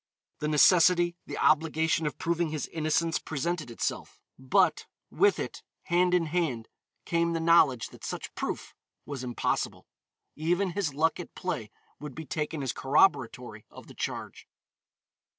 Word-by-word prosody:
The 150 Hz, -, -2 dB
necessity, 175 Hz, +3 st, +5 dB
the -, -, -5 dB
obligation 160 Hz, +1 st, +2 dB
of 145 Hz, -, -4 dB
proving 170 Hz, 0 st, 0 dB
his 155 Hz, -1 st, -3 dB
innocence 165 Hz, +1 st, 0 dB
presented 160 Hz, -1 st, -3 dB
itself, 115 Hz, -, -4 dB, 0.2 s
but, 130 Hz, -1 st, +2 dB, 0.2 s
with 400 Hz, +1 st, +3 dB
it, -, -, -5 dB, 0.2 s
hand 180 Hz, +1 st, +2 dB
in 175 Hz, -2 st, +2 dB
hand, 150 Hz, -9 st, -2 dB, 0.4 s
came 170 Hz, 0 st, +1 dB
the 165 Hz, -, -1 dB
knowledge 160 Hz, -7 st, +4 dB
that -, -, -16 dB
such -, -, -5 dB
proof -, -, -4 dB, 0.3 s
was 140 Hz, -3 st, -6 dB
impossible. 120 Hz, -1 st, -2 dB, 0.5 s
Even 175 Hz, +5 st, 0 dB
his 170 Hz, -6 st, -2 dB
luck 160 Hz, +4 st, +1 dB
at 175 Hz, -, -9 dB
play 145 Hz, -, -3 dB, 0.3 s
would 150 Hz, -1 st, -8 dB
be 160 Hz, -, -7 dB
taken 150 Hz, +1 st, -3 dB
as 130 Hz, -, -2 dB
corroboratory 130 Hz, -, +1 dB
of -, -, -13 dB
the -, -, -13 dB
charge. -, -, -5 dB
160 Hz, 145 wpm, -28 LUFS, 140-170 Hz, 0.5 s, necessity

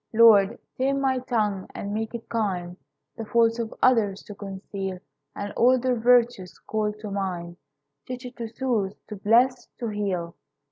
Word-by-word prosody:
Lord, 220 Hz, -1 st, +6 dB, 0.2 s
tame 275 Hz, +1 st, +1 dB
my 265 Hz, -1 st, +1 dB
tongue, 215 Hz, -6 st, -1 dB
and 200 Hz, 0 st, -4 dB
make 220 Hz, +2 st, -3 dB
it 230 Hz, -, -7 dB
kind 185 Hz, -6 st, -2 dB, 0.4 s
The 225 Hz, -, -5 dB
faults 230 Hz, +1 st, +3 dB
of 230 Hz, -1 st, -3 dB
others 215 Hz, -6 st, +3 dB
to 205 Hz, -, -9 dB
conceal 195 Hz, -1 st, -6 dB, 0.4 s
And 200 Hz, 0 st, -5 dB
all 255 Hz, +2 st, +5 dB
their 255 Hz, 0 st, +1 dB
virtues 240 Hz, -5 st, +3 dB
call 215 Hz, -1 st, -2 dB
to 210 Hz, -2 st, -6 dB
mind; 180 Hz, -3 st, -3 dB, 0.5 s
Teach 255 Hz, 0 st, -6 dB
it 245 Hz, 0 st, -8 dB
to 230 Hz, -2 st, -4 dB
soothe, 225 Hz, -5 st, -1 dB, 0.2 s
to 210 Hz, -, -5 dB
bless, 240 Hz, +5 st, +3 dB
to 235 Hz, -, -3 dB
heal. 190 Hz, -5 st, -2 dB
220 Hz, 160 wpm, -25 LUFS, 195-245 Hz, 0.5 s, Lord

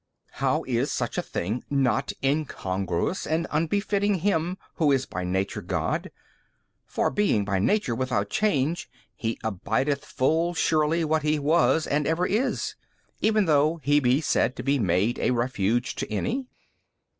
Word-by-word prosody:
B. -, -, -47 dB
How -, -, +1 dB
is -, -, -1 dB
such -, -, -2 dB
a -, -, +1 dB
thing 105 Hz, +8 st, -3 dB
not 135 Hz, -1 st, +1 dB
incongruous 100 Hz, -, -1 dB
and 160 Hz, +1 st, 0 dB
unbefitting 200 Hz, +6 st, +1 dB
Him 180 Hz, -1 st, 0 dB, 0.2 s
Who 155 Hz, -4 st, +3 dB
is 135 Hz, -1 st, +2 dB
by 90 Hz, -, -5 dB
Nature 95 Hz, +2 st, -1 dB
God: -, -, -2 dB, 0.8 s
for -, -, 0 dB
being 200 Hz, -, +1 dB
by 100 Hz, -2 st, 0 dB
Nature 200 Hz, -, +1 dB
without 115 Hz, -5 st, -1 dB
change, 165 Hz, -6 st, 0 dB, 0.3 s
He 115 Hz, 0 st, -3 dB
abideth 110 Hz, +7 st, -1 dB
full 165 Hz, +6 st, 0 dB
surely 160 Hz, +1 st, +2 dB
what 155 Hz, 0 st, +1 dB
He 150 Hz, +1 st, +1 dB
was 160 Hz, +2 st, +3 dB
and 150 Hz, 0 st, 0 dB
ever 165 Hz, +3 st, +1 dB
is, 225 Hz, +8 st, 0 dB, 0.5 s
even 215 Hz, -2 st, +3 dB
though 155 Hz, +1 st, +3 dB
He 145 Hz, +1 st, +4 dB
be 130 Hz, +1 st, +2 dB
said 130 Hz, -, +1 dB
to -, -, -6 dB
be 140 Hz, 0 st, +1 dB
made 100 Hz, +3 st, +1 dB
a -, -, +1 dB
refuge 120 Hz, -1 st, 0 dB
to -, -, -4 dB
any? 250 Hz, -, -2 dB
145 Hz, 155 wpm, -26 LUFS, 120-165 Hz, 0.8 s, He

